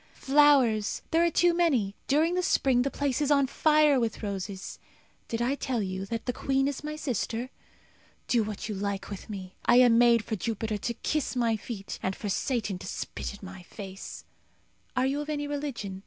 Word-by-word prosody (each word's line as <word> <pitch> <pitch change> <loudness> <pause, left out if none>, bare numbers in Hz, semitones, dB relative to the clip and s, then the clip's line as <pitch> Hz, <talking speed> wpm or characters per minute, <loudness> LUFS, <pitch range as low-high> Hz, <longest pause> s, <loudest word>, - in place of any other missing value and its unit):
Flowers! 270 -7 +3
there 330 +1 +4
are 340 - +4
too 350 +1 +3
many 275 - +2
during 315 +5 +3
the 365 - +1
spring 265 -8 +3
the 275 - +1
place 280 -1 -1
is 290 - +1
on 280 -2 +4
fire 300 0 +4
with 230 -2 -2
roses. 195 -1 -5 0.5
Did 230 +1 -2
I 255 +3 +1
tell 255 -5 -2
you 190 0 -4
that 230 +1 -4
the 250 - -1
queen 270 +1 +1
is 285 0 -4
my 305 0 -4
sister? 250 -3 -3 0.8
Do 240 - +3
what 210 -1 -5
you 215 - -3
like 200 0 -3
with 200 - -8
me. 190 -3 -7
I 240 - +5
am 245 -2 +6
made 235 -2 +5
for 220 - -2
Jupiter 220 0 -3
to 235 +4 -3
kiss 305 -3 -2
my 235 -2 +2
feet, 205 -2 -7
and 190 0 -1
for 210 - -5
Satan 215 -3 -1
to - - -8
spit - - -5
in - - -14
my 190 -1 -9
face. 195 +1 -9 0.7
Are 255 - +3
you 280 +2 0
of 295 - -7
any 290 -1 -2
religion? 280 -10 -4
240 Hz, 200 wpm, -28 LUFS, 205-285 Hz, 0.8 s, am